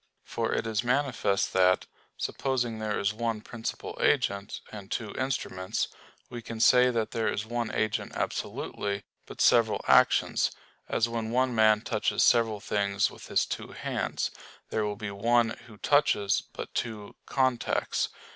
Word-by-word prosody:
For - - -2
it - - 0
is 110 0 -1
manifest 125 -6 +1
that, 90 0 +4 0.3
supposing 120 -4 -1
there 110 -1 -1
is 100 +1 0
one 115 0 -2
principal 115 0 -6
agent, 100 0 +1
and 100 -2 -9
two 110 -2 -3
instruments, 110 -7 -2 0.4
we 120 -1 -7
can 115 0 -7
say 125 +2 +6
that 115 -3 -1
there 115 -1 0
is 105 - -3
one 120 0 -2
agent 110 -1 -1
absolutely, 100 -1 -3 0.2
but - - -7
several 115 -3 +4
actions; - - +4 0.4
as 115 - +2
when 115 -1 -3
one 125 +2 +1
man 110 -1 +5
touches 110 -2 0
several 115 -3 +4
things 100 -1 0
with - - -12
his - - +2
two - - -6
hands, - - -2 0.4
there 110 - 0
will 105 0 -2
be 100 0 -5
one 115 +3 +2 0.2
who 110 -2 -14
touches, 105 -8 +3
but - - -7
two 110 -4 -4
contacts. 130 -2 0
110 Hz, 150 wpm, -28 LUFS, 105-120 Hz, 0.4 s, say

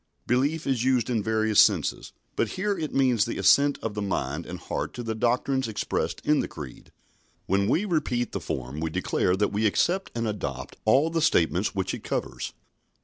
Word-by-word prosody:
"Belief" 140 +6 +1
is 130 -4 0
used 130 -1 +2
in 115 -3 +1
various 110 0 +3
senses, - - +1 0.2
but - - 0
here 200 +2 -1
it 160 -4 -4
means 125 -5 +3
the 115 - -4
assent 140 0 +4
of 115 - -2
the 105 - -3
mind 85 -6 -2
and 90 - -6
heart - - -4
to 120 - -5
the 115 -1 -2
doctrines 125 +3 0
expressed 110 - -2
in 150 0 +3
the - - -1
Creed. 70 -6 -10 0.5
When 100 +1 +1
we 180 - +2
repeat 130 - -1
the - - -4
form 65 +3 -4
we 80 0 -1
declare 90 +3 0
that 105 +2 +1
we 110 +2 +2
accept 180 - +1
and 115 -1 -1
adopt 105 -2 -4
all 135 +9 +4
the 165 0 0
statements 90 - +2
which 95 -1 -1
it - - -6
covers. - - -3
115 Hz, 195 wpm, -26 LUFS, 100-135 Hz, 0.5 s, assent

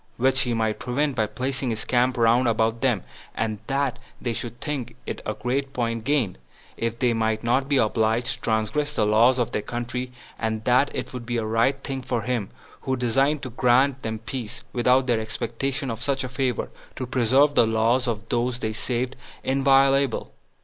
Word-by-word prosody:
which 130 +1 +3
he 125 -3 0
might 110 -1 0
prevent 140 +3 -1
by 110 -3 +1
placing 130 +2 -2
his 110 -1 -3
camp 125 +1 +2
round 120 +2 +4
about 115 0 +1
them; 120 -8 +1 0.3
and 110 -2 -2
that 135 -3 0 0.2
they 120 - -2
should 120 +1 -6
think 130 -6 -4
it - - -5
a - - -2
great 135 +2 -2
point 115 -2 -1
gained, 125 - 0 0.4
if 115 0 -2
they 120 -1 +2
might 110 -1 0
not 130 +4 +1
be 140 - +3
obliged 110 +1 +2
to 115 - -10
transgress 115 +7 0
the 105 - +2
laws 115 +5 +5
of 120 -3 0
their - - -1
country; 120 +3 -4 0.3
and 110 -1 -2
that 130 +3 +4
it - - -4
would 125 -2 -5
be 120 0 -2
a 110 - -1
right 115 +5 +1
thing 135 -1 -3
for 125 -3 -2
him, 120 -5 -1 0.3
who 130 - -1
designed 135 +4 +1
to 130 - -5
grant 130 +3 +3
them 110 -1 -3
peace, 115 0 -6
without 125 +2 +3
their 120 -3 +2
expectation 135 +4 -2
of 115 0 -6
such 135 +1 0
a 130 - -4
favor, 125 -2 -1 0.2
to 130 - -4
preserve 130 +4 +3
the 115 - +5
laws 115 +3 +2
of 110 -2 -3
those 120 +1 0
they 110 -3 -3
saved 125 +3 -2 0.3
inviolable. 135 -1 +3
125 Hz, 190 wpm, -24 LUFS, 115-135 Hz, 0.4 s, laws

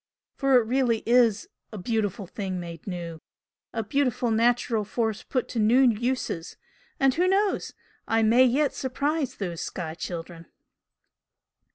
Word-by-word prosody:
For 275 -2 +3
it - - 0
really 235 -1 +1
IS 235 -3 +3 0.2
'a 215 - -7
beautiful 205 -1 -2
thing 190 0 -4
made 170 -1 -8
new' 170 -3 -5 0.5
a 225 - -2
beautiful 250 0 0
natural 230 -1 +2
force 220 0 -2
put 255 - -2
to 235 - -3
new 225 +5 +5
uses 240 -7 0 0.4
and 270 -1 +4
who 355 +5 +2
knows? 395 +2 +1 0.3
I 225 0 +2
may 235 +4 +6
yet 270 +3 +2
surprise 275 +1 -2
those 175 -5 -4
'sky 165 -3 -5
children!'" 170 0 -7
225 Hz, 140 wpm, -26 LUFS, 195-255 Hz, 0.5 s, may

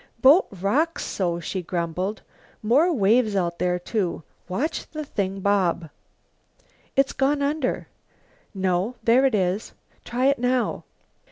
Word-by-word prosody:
"Boat 285 +10 +6
rocks 295 - +1
so," 175 -3 -1
she 185 +3 -4
grumbled. 180 +4 -3 0.4
"More 280 +11 +4
waves 220 - +3
out 170 -3 -1
there, 180 0 +1
too. 180 -2 -2 0.3
Watch 255 - -2
the 305 -1 -6
thing 195 -6 -3
bob!" 180 -5 +1 1.0
"It's 275 0 +2
gone 280 +2 +1
under!" 285 -2 -1 0.6
"No, 190 +3 -1
there 255 +4 +5
it 255 - 0
is!" 190 +2 -1 0.3
"Try 245 +2 -1
it 280 +1 +3
now." 250 0 0
210 Hz, 125 wpm, -24 LUFS, 185-270 Hz, 1.0 s, Boat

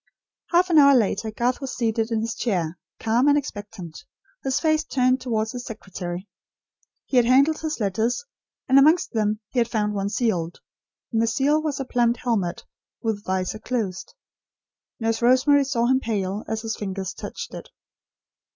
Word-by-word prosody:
Half 360 +1 +3
an 320 - +7
hour 280 -1 +7
later 220 -2 +1
Garth 240 +4 -1
was 270 -2 -5
seated 225 -1 0
in 225 -2 0
his 225 0 -2
chair, 175 -7 -2 0.2
calm 235 +5 +2
and 290 0 +5
expectant; 205 - -6 0.4
his 265 -1 0
face 310 -1 +2
turned 255 0 +1
towards 220 -3 -1
his 245 -1 -6
secretary. 185 -4 -6 0.8
He 260 - 0
had 240 -1 +5
handled 275 +5 +4
his 310 -3 -3
letters, 220 - 0 0.4
and 265 +1 +6
amongst 310 +5 +4
them 215 -1 0
he 255 - 0
had 235 - +2
found 210 -3 -1
one 200 0 -1
sealed; 180 -8 -1 0.5
and 225 - +2
the 230 - +2
seal 280 +7 +2
was 300 -3 -2
a 270 - -3
plumed 240 -1 +1
helmet, 205 -8 -2 0.4
with 220 -3 -2
visor 190 +1 -2
closed. 215 - -3 0.8
Nurse 225 0 -1
Rosemary 260 +4 +5
saw 245 -4 0
him 260 +2 +3
pale, 205 -4 -2
as 220 0 -3
his 225 -1 -2
fingers 190 -2 -4
touched - - -7
it. - - -8
230 Hz, 170 wpm, -24 LUFS, 210-260 Hz, 0.8 s, an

